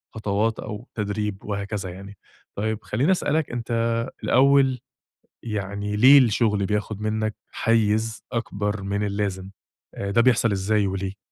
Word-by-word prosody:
خطوات 110 +1 0
أو 110 +4 -7
تدريب 105 -1 -3
وهكذا 100 -1 -3
يعني. 100 +2 -10 0.4
طيب 110 +1 -2
خلّيني 130 - +1
أسألك 160 -5 0
أنت 115 0 -1 0.2
الأول، 135 -1 +4 0.6
يعني 105 -1 -3
ليه 130 +6 +8
الشغل 110 -5 +2
بياخد 105 0 -2
منك 110 0 -1 0.2
حيز 110 -1 +1
أكبر 105 -3 -2
من 100 +2 -2
اللازم، 100 -2 -3 0.4
آآ 100 - -4
ده 115 +4 +3
بيحصل 115 -2 +3
إزاي، 100 +1 +1
وليه؟ 95 0 -3
105 Hz, 125 wpm, -24 LUFS, 100-115 Hz, 0.6 s, ليه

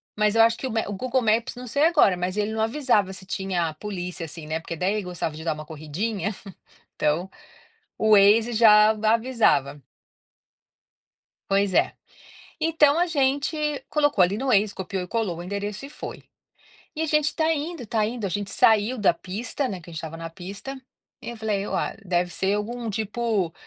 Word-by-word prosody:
mas 210 +1 +2
eu 225 - +6
acho 230 0 +3
que 260 - -4
o - - -5
ma 225 0 +1
o 205 - -4
Google 255 +5 0
Maps 225 +3 +1
não 250 0 -8
sei 285 +7 +2
agora, 300 - +4
mas 180 +3 -3
ele 210 +1 0
não 220 - -1
avisava 225 -5 +1
se 190 0 -10
tinha 180 -4 -2
polícia 180 -3 -5
assim, 160 0 -8
né, 160 +1 -2
porque 165 0 -6
daí 185 +5 0
ele 210 -2 -2
gostava 175 -3 -4
de 160 - -8
dar 160 -2 0
uma 155 0 -9
corridinha, 165 +7 -3 0.7
então, 165 +5 0 0.7
o 220 0 +2
Waze 215 +3 +6
já 215 -1 +7
avisava. 215 - +2 1.7
Pois 195 -1 +1
é. - - +3 0.7
Então 320 -1 +3
a 355 - +2
gente 285 0 0 0.3
colocou 290 -9 +2
ali 195 +4 +1
no 265 +2 -3
Waze, 210 -3 +3
copiou 190 0 -4
e - - -8
colou 215 -7 -2
o 175 - -6
endereço 200 +5 -4
e - - -10
foi. - - -8 0.7
E 315 - -3
a - - +1
gente 300 -1 +1
tá 320 0 +2
indo 305 -3 -4
tá 215 -1 0
indo, 225 -2 -4
a - - -1
gente 200 +2 -3
saiu 220 +3 +3
da 200 -5 +3
pista, 225 +10 -4
né, 190 -5 -5
que 170 - -13
a - - -10
gente - - -6
estava 165 0 -6
na 165 0 -6
pista, 200 +11 -8 0.4
e - - -6
eu 235 - -7
falei: 210 -2 -2
"Olha, - - -2
deve 175 -1 0
ser 195 +3 0
algum 230 +2 -4
tipo", 215 -4 -1
210 Hz, 195 wpm, -24 LUFS, 180-240 Hz, 1.7 s, já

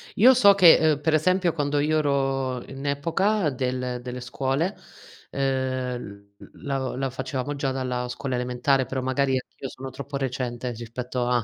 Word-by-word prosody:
Io 255 +5 +7
so 200 -5 +6
che, 180 -4 +8
ehm, 155 -2 +2
per 160 +1 +1
esempio, 180 +2 +2
quando 145 -2 0
io 155 +2 +2
ero 135 -3 0
in 135 +1 -8
epoca 165 +7 +1
del 125 -1 -2
delle 125 0 -6
scuole, 135 +8 -1 0.5
ehm, 130 -6 -3
l - - -14
l 135 -2 -2
la 135 0 -1
facevamo 135 +2 -4
già 140 -1 -1
dalla 125 -2 -2
scuola 125 +1 -3
elementare, 125 +2 +1
però, 130 +1 -3
magari, 130 +1 0
anch'io, 130 +1 -9
sono 130 +1 -8
troppo 140 +1 -6
recente, 125 -2 -3
rispetto 120 +2 -4
a 120 -2 +2
135 Hz, 165 wpm, -25 LUFS, 125-145 Hz, 0.5 s, che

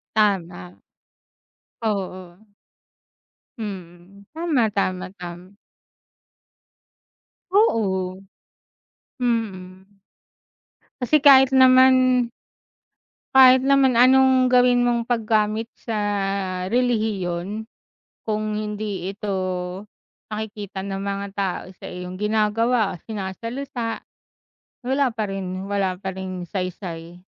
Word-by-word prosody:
Tama 195 - +1 1.2
oo. 190 -1 -4 1.1
Mm, 195 -1 -9
tama, 310 -9 +1
tama 185 -2 -2
tam 180 +2 -10 1.9
Oo. 190 - +1 1.0
Mm. 195 -4 -3 1.0
Kasi 285 +4 +2
kahit 265 -2 +7
naman 255 -1 +5 1.1
kahit 260 -1 +8
naman 270 -3 +4
anong 260 0 +5
gawin 245 -1 +4
mong 235 -1 +1
paggamit 220 -1 0 0.2
sa 225 -2 -3 0.7
relihiyon 215 -4 -1 0.6
kung 215 -1 -2
hindi 210 -3 -4
ito 200 -1 -4 1.0
nakikita 210 -2 -5
ng 195 0 -4
mga 200 0 -3
tao 195 -2 -2
sa - - -16
iyong 180 0 -7
ginagawa, 215 0 +1
sinasalitaa, 230 +4 -5 0.8
wala 270 +2 +1
pa 220 - -2
rin 190 -1 -5
wala 195 -2 0
pa 190 -1 -4
ring 185 -1 -6
saysay. 175 -3 -5
210 Hz, 80 wpm, -22 LUFS, 190-245 Hz, 1.9 s, kahit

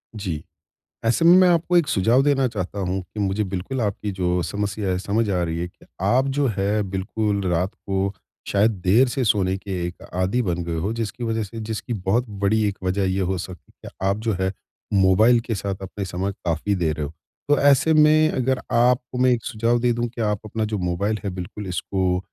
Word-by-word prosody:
जी। 90 -8 -4 0.6
ऐसे 120 +9 +2
में 170 +1 +8
मैं 185 0 +6
आपको 175 +1 +3
एक 170 -4 +3
सुझाव 120 +1 +3
देना 135 -2 +3
चाहता 100 -3 -4
हूँ 95 0 -1
कि 95 +4 -10
मुझे 100 +1 0
बिल्कुल 95 +7 -4
आपकी 105 -1 -2
जो 90 -2 0
समस्या 100 0 -2
है, 90 - +1
समझ 105 +3 0
आ 90 -2 +1
रही 85 -1 -2
है 85 - -2
कि 90 - -21 0.2
आप 125 +8 +3
जो 140 +1 +1
है 100 +2 +1
बिल्कुल 100 +2 -1
रात 90 +3 0
को, 95 0 -2 0.3
शायद 105 +3 +3
देर 115 +9 +5
से 130 +2 -1
सोने 95 -4 +2
के 100 +1 -9 0.2
एक 85 - -9
आदी 95 +7 +1
बन 90 -5 -1
गए 85 0 -3
हो 95 +7 -1
जिसकी 115 +1 -4
वजह 115 -1 -1
से 115 +3 -8
जिसकी 110 +2 -4
बहुत 105 +4 0
बड़ी 105 +2 +1
एक 100 - -3
वजह 95 +2 0
ये 95 +1 0
हो 95 - -1
सकती 90 0 -9
कि - - -6 0.2
आप 100 +1 +2
जो 110 - +2
है 95 0 +1 0.4
मोबाइल 100 +5 +5
के 115 -1 -3
साथ 100 0 -3
अपने 95 +1 -5
समय 95 +2 -2
काफ़ी 85 +4 0
दे 85 -4 0
रहे 75 -1 -3
हो। 70 - -8 0.4
तो 145 - +5
ऐसे 140 +3 +4
में 155 0 +5
अगर 130 0 0
आपको 125 +1 +2
मैं 130 0 +4
एक 120 -2 0
सुझाव 115 +1 +1
दे 120 +1 +2
दूँ 120 +1 -1
कि, 120 0 -7
आप 105 -2 0
अपना 110 +1 -2
जो 105 0 -2
मोबाइल 95 +4 -1
है 100 - -2
बिल्कुल 95 +2 -6
इसको 90 +1 -1
105 Hz, 215 wpm, -23 LUFS, 95-120 Hz, 0.6 s, में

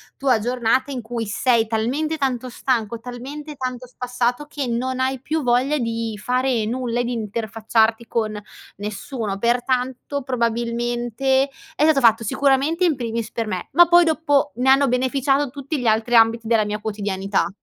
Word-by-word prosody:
tua 260 -4 +2
giornata 245 +3 0
in 255 -3 -4
cui 230 0 -4
sei 225 +2 +2
talmente 260 +9 -1
tanto 255 -3 -1
stanco, 235 -3 -1
talmente 275 +5 -8
tanto 255 -2 -4
spassato 250 +2 -2
che 290 -2 -4
non 255 +2 -2
hai 260 0 0
più 310 +2 -2
voglia 250 +4 +2
di 230 -3 -3
fare 250 -2 +1
nulla 240 +1 -1
e - - -1
di 245 - -3
interfacciarti 225 +1 0
con 215 -2 -2 0.4
nessuno. 210 +1 -4
Pertanto, 250 +4 -1
probabilmente 240 +2 0 0.3
è 300 - +1
stato 310 -3 +4
fatto 230 -2 +4
sicuramente 280 - +2
in 315 -4 +2
primis 230 -2 -3
per 230 -1 -2
me, 185 -3 -4
ma 345 0 +7
poi 345 0 +7
dopo 300 -2 +1
ne 255 +2 +1
hanno 275 +1 +5
beneficiato 270 +2 +1
tutti 280 +3 -4
gli 250 - -4
altri 220 +2 +2
ambiti 225 0 +4
della 225 -2 +3
mia 210 0 -3
quotidianità. 200 -2 -1
245 Hz, 160 wpm, -21 LUFS, 225-270 Hz, 0.4 s, ma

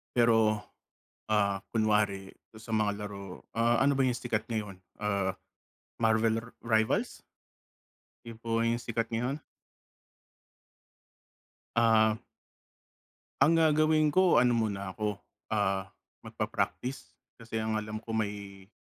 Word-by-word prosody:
Pero, 110 -2 +4 0.7
ah, 100 -2 +2
kunwari 105 -3 +1 0.2
sa 110 0 -7
mga 105 -1 0
laro, 100 -2 -9
ah, 115 +1 +3
ano 140 +1 +4
ba 135 - +1
yung 125 -2 +1
sikat 105 -1 -2
ngayon? 105 -4 -4 0.2
Ah, 100 -2 -1 0.6
Marvel 110 0 +3 0.2
Rivals? 110 -1 +1 1.1
Yun 115 -1 -8
po 115 0 -1
yung 115 +1 +1
sikat 115 -1 -2
ngayon? 130 +6 -1 2.4
Ah. 110 -2 +4 1.2
Ang 155 +4 +5
gagawin 155 -1 +4
ko, 185 +1 +4
ano 125 0 +5
muna 100 -5 -1
ako, 105 0 -2 0.3
ah, 95 -2 0 0.3
magpa-practice 130 +2 -3 0.2
kasi 115 0 -8
ang 110 0 0
alam 105 0 -6
ko 115 - -7
may 100 -3 -4
110 Hz, 110 wpm, -30 LUFS, 105-115 Hz, 2.4 s, Ang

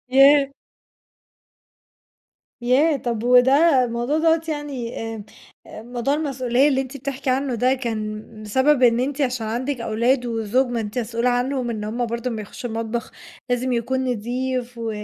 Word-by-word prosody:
ياه! 275 0 +6 2.1
ياه! 280 +5 +3
طَب 235 -4 -3
وده، 260 +3 +5
الموضوع 240 +6 -1
دَوّة 325 0 +3
يعني 285 -6 -4 0.2
آمم، 210 -2 -8 0.4
موضوع 240 +4 -3
المسؤولية 270 -2 +1
اللي 265 -2 +2
أنتِ 270 +1 -6
بتحكي 270 0 -3
عنه 265 0 0
ده 250 +3 +2
كان 215 -4 -4 0.2
بسبب 260 +6 +2
إن 235 -1 +5
أنتِ 280 +3 -2
عشان 250 -4 -1
عَندِك 245 +3 -2
أولاد 235 +3 +1
وزوج؟ 230 +3 +1
ما 240 -2 -2
أنتِ 210 +3 -4
مسؤولة 235 +1 -1
عنهم 250 0 -1
إن 215 -2 -4
هُم 235 +3 -2
برضه 235 +2 -3
أمّا 220 -2 -4
يخشّوا 235 +3 -7
المطبخ 230 +2 -3 0.4
لازم 245 +1 0
يكون 260 +3 -1
نضيف 250 +1 -3
و 230 -1 -3
250 Hz, 150 wpm, -22 LUFS, 235-270 Hz, 2.1 s, ياه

